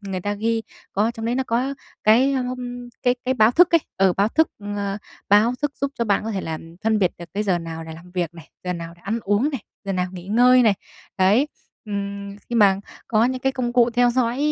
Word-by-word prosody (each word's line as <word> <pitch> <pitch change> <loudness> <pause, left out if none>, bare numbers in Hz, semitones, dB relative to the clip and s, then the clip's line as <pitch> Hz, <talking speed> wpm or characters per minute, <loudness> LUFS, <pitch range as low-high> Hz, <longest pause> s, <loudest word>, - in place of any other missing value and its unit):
người 195 -3 -4
ta 205 +2 -2
ghi 225 +2 0 0.3
có 200 - +1
ở 230 - +2
trong 225 -1 -7
đấy 235 - 0
nó 265 - +1
có 255 +4 0 0.3
cái, 245 +6 +5
ờm, 250 -1 -4
cái 245 0 +3
cái 260 +1 +1
báo 220 -2 +5
thức 350 +7 +5
ấy, 335 - +6 0.2
ừ, 190 -1 +4
báo 200 +2 +3
thức, 320 +7 +3 0.3
ờ, 200 0 -2 0.3
báo 210 +4 +5
thức 290 -1 0
giúp 280 0 0
cho 235 - +1
bạn 210 -1 +1
có 225 - -2
thể 195 -3 -2
là, 160 -2 -4 0.3
phân 220 -1 +3
biệt 185 -3 +3
được 175 - -7
cái 210 - 0
giờ 190 -4 +1
nào 165 -1 -6
để 160 - -8
làm 175 +2 -13
việc 175 -2 -2
này, 165 -2 -13
giờ 180 - -1
nào 170 -1 -6
để - - -22
ăn 215 +4 -1
uống 205 +9 +1
này, 270 -6 -4 0.2
giờ 195 - -2
nào 180 -1 0
nghỉ 180 -1 -9
ngơi 245 +4 +5
này. 215 -3 +4 0.4
Đấy, 210 +10 +4 0.4
ừm, 200 -1 -5
khi 240 - -4
mà 200 -3 +6 0.3
có 220 0 +3
những 255 +1 -1
cái 265 +1 +1
công 245 -2 -2
cụ 240 -1 +4
theo 245 +1 +3
dõi 245 0 0
220 Hz, 250 wpm, -22 LUFS, 195-245 Hz, 0.4 s, ấy